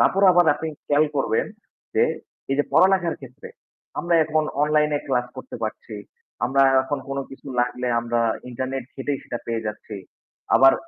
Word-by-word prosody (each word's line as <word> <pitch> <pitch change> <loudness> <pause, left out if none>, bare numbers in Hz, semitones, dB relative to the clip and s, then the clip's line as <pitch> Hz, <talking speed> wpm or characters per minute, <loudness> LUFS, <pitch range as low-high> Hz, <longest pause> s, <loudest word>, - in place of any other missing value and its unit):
তারপর 195 - +3
আবার 175 -1 +5
আপনি 160 +2 -4 0.2
খেয়াল 145 +1 +4
করবেন, 135 -5 +1 0.5
যে - - +5 0.5
এই 135 - +1
যে 145 - +3
পড়ালেখার 185 -3 +4
ক্ষেত্রে 130 -2 -11 0.5
আমরা 175 0 +1
এখন 155 0 +1 0.2
অনলাইনে 150 0 +2
ক্লাস 125 -2 0
করতে 130 - -8
পারছি। 110 0 -5 0.5
আমরা 135 +3 +3 0.2
এখন 140 +2 -2
কোন 135 0 -3
কিছু 135 - -12
লাগলে 125 +1 -1
আমরা 120 0 -1 0.3
ইন্টারনেট 130 +1 -3
ঘেটেই 135 +1 -2
সেটা 120 - -5
পেয়ে 115 -1 -2
যাচ্ছি। 105 0 -6 0.6
আবার 135 0 +8
135 Hz, 155 wpm, -23 LUFS, 125-150 Hz, 0.6 s, আবার